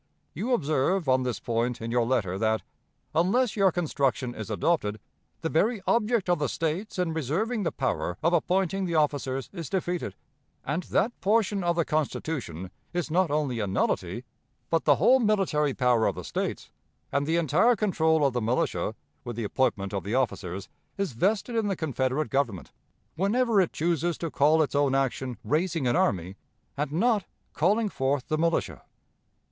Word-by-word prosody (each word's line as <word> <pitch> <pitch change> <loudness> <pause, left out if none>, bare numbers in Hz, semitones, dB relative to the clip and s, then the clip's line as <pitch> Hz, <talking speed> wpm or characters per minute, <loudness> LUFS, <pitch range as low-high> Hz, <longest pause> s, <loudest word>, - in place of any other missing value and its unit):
You 225 - -1
observe 155 - +1
on 130 0 +4
this 125 -2 -2
point 120 +1 -1
in 115 0 -4
your 120 -1 +2
letter 100 -7 0
that, 110 0 +1 0.5
unless 200 +8 +2
your 195 -3 +4
construction 135 -7 -1
is 110 -5 -7
adopted, 110 -11 0 0.4
'the 165 - -1
very 215 +8 +2
object 230 -3 +2
of 175 -2 +2
the 145 -3 0
States 165 +7 -2
in 180 -3 0
reserving 180 - -1
the 180 - 0
power 125 -9 -2
of 170 +2 +3
appointing 190 +2 +1
the 170 -2 -2
officers 135 -4 0
is 170 -6 -6
defeated, 180 -2 -2 0.5
and 150 +6 -1
that 230 +5 0
portion 205 -1 +2
of 170 0 +1
the 170 -2 +1
Constitution 135 - -3 0.2
is 175 -2 -2
not 180 0 +3
only 145 -5 0
a 105 - -1
nullity, 95 - -1 0.5
but 165 - +1
the 145 - +6
whole 260 - +5
military 190 - +1
power 120 -3 +3
of - - -1
the - - -6
States, - - -4 0.4
and 140 +1 0
the 165 +1 +2
entire 170 - +3
control 160 -7 +2
of 135 - +2
the 120 - -1
militia, 115 +3 0 0.3
with 120 - -5
the 115 - -3
appointment 105 -3 0
of 100 - -2
the 105 +4 -2
officers, 100 -7 -2 0.3
is 195 -5 -1
vested 205 - 0
in 225 -2 +1
the 195 - 0
Confederate 145 -2 -1
Government, 135 -10 -1 0.4
whenever 210 +4 +2
it 180 - 0
chooses 170 +1 0
to 165 -2 -4
call 155 +3 +4
its 145 - -4
own 140 -1 +2
action 130 -2 -1
"raising 165 -1 0
an 120 0 +2
army," 90 +1 0 0.4
and 145 0 -2
not 210 +4 +2 0.3
"calling 210 +8 +2
forth 135 -6 -1
the 155 - +1
militia."' 165 0 0
155 Hz, 175 wpm, -27 LUFS, 130-185 Hz, 0.5 s, the